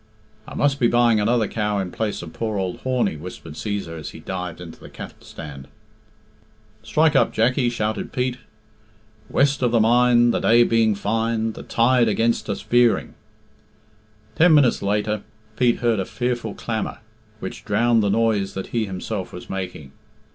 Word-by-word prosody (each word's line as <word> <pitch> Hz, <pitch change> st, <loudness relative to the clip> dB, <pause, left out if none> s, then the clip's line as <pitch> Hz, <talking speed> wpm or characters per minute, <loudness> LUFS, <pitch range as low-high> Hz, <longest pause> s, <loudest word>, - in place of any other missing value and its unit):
"I -, -, -9 dB
must 140 Hz, -1 st, +1 dB
be 120 Hz, -, +4 dB
buying 120 Hz, -2 st, +3 dB
another 110 Hz, +1 st, +2 dB
cow 105 Hz, -1 st, -1 dB
in 95 Hz, -2 st, -2 dB
place 110 Hz, -5 st, -3 dB
of 85 Hz, -, -9 dB
poor 110 Hz, -2 st, -3 dB
ould 95 Hz, -2 st, -2 dB
Horney," 125 Hz, -10 st, 0 dB
whispered 80 Hz, -1 st, -9 dB
Cæsar 100 Hz, -3 st, -4 dB
as 75 Hz, -, -6 dB
he -, -, -11 dB
dived 90 Hz, -2 st, -5 dB
into 85 Hz, -2 st, -10 dB
the -, -, -12 dB
cattle -, -, -10 dB
stand. 70 Hz, -3 st, -10 dB, 1.1 s
"Strike 155 Hz, +6 st, +2 dB
up, -, -, +4 dB
Jackie," 120 Hz, +2 st, +2 dB
shouted 110 Hz, -2 st, -3 dB
Pete. 125 Hz, 0 st, -1 dB, 0.9 s
"West 140 Hz, 0 st, +2 dB
of 125 Hz, -, +3 dB
the 115 Hz, 0 st, +2 dB
mine, 120 Hz, +1 st, +4 dB
The -, -, 0 dB
day 120 Hz, +1 st, +5 dB
being 115 Hz, -2 st, +2 dB
fine. 115 Hz, +2 st, -1 dB
The -, -, -9 dB
tide 120 Hz, 0 st, +3 dB
against 115 Hz, +1 st, 0 dB
us 100 Hz, -, -3 dB
veering." 120 Hz, -1 st, +2 dB, 1.2 s
Ten 165 Hz, 0 st, +6 dB
minutes 140 Hz, -5 st, +4 dB
later 105 Hz, +1 st, 0 dB, 0.3 s
Pete 120 Hz, -1 st, +2 dB
heard 115 Hz, -3 st, +2 dB
a 95 Hz, -, -1 dB
fearful 120 Hz, -2 st, -3 dB
clamour, 110 Hz, -2 st, -3 dB, 0.4 s
which -, -, -7 dB
drowned 115 Hz, +2 st, +2 dB
the 100 Hz, -, +1 dB
noise 105 Hz, -2 st, +1 dB
that 95 Hz, -, -4 dB
he 115 Hz, -3 st, 0 dB
himself 95 Hz, +1 st, -5 dB
was 90 Hz, -, -9 dB
making. 90 Hz, -7 st, -6 dB
110 Hz, 165 wpm, -22 LUFS, 100-120 Hz, 1.2 s, Ten